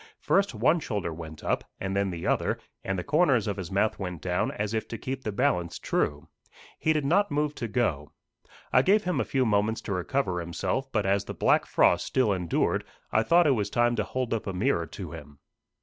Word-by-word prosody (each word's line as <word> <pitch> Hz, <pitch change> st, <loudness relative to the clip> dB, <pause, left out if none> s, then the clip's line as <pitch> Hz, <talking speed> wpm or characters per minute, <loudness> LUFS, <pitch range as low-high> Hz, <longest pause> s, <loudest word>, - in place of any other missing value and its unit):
First 200 Hz, +1 st, +1 dB
one 170 Hz, -, +3 dB
shoulder 100 Hz, -, -3 dB
went 80 Hz, -1 st, -9 dB
up, -, -, 0 dB, 0.2 s
and 95 Hz, 0 st, -3 dB
then 100 Hz, 0 st, +1 dB
the 85 Hz, -2 st, -5 dB
other, -, -, +1 dB, 0.3 s
and 95 Hz, 0 st, -2 dB
the 90 Hz, -, -3 dB
corners 145 Hz, -, +3 dB
of 100 Hz, -2 st, -1 dB
his 90 Hz, -4 st, -5 dB
mouth 105 Hz, +3 st, +1 dB
went 90 Hz, -4 st, -4 dB
down, 90 Hz, +3 st, 0 dB
as 105 Hz, +1 st, -3 dB
if 110 Hz, -, -2 dB
to 115 Hz, -, -5 dB
keep 130 Hz, +2 st, -5 dB
the 105 Hz, -, -2 dB
balance 100 Hz, -, 0 dB
true. 75 Hz, 0 st, -1 dB, 0.5 s
He 160 Hz, -, +2 dB
did 155 Hz, -3 st, +1 dB
not 200 Hz, +8 st, +3 dB
move 150 Hz, 0 st, 0 dB
to 120 Hz, -, -4 dB
go. 90 Hz, -, -1 dB, 0.6 s
I -, -, +7 dB
gave 205 Hz, +3 st, +3 dB
him 180 Hz, -2 st, 0 dB
a -, -, +2 dB
few 130 Hz, -3 st, 0 dB
moments 110 Hz, +1 st, +1 dB
to 100 Hz, -, -4 dB
recover 95 Hz, 0 st, -1 dB
himself, 90 Hz, -, -2 dB
but 105 Hz, -3 st, 0 dB
as 100 Hz, 0 st, +1 dB
the -, -, -6 dB
black -, -, +3 dB
frost -, -, +3 dB
still 125 Hz, -6 st, +2 dB
endured, 90 Hz, -3 st, 0 dB, 0.3 s
I 110 Hz, -, +3 dB
thought 170 Hz, +10 st, +4 dB
it 145 Hz, -, +5 dB
was 105 Hz, -6 st, 0 dB
time 120 Hz, +2 st, +2 dB
to -, -, +1 dB
hold 130 Hz, -2 st, -2 dB
up 110 Hz, -, -3 dB
a 95 Hz, -, -2 dB
mirror 90 Hz, -4 st, 0 dB
to -, -, -8 dB
him. 75 Hz, -3 st, -10 dB
105 Hz, 220 wpm, -27 LUFS, 90-135 Hz, 0.6 s, I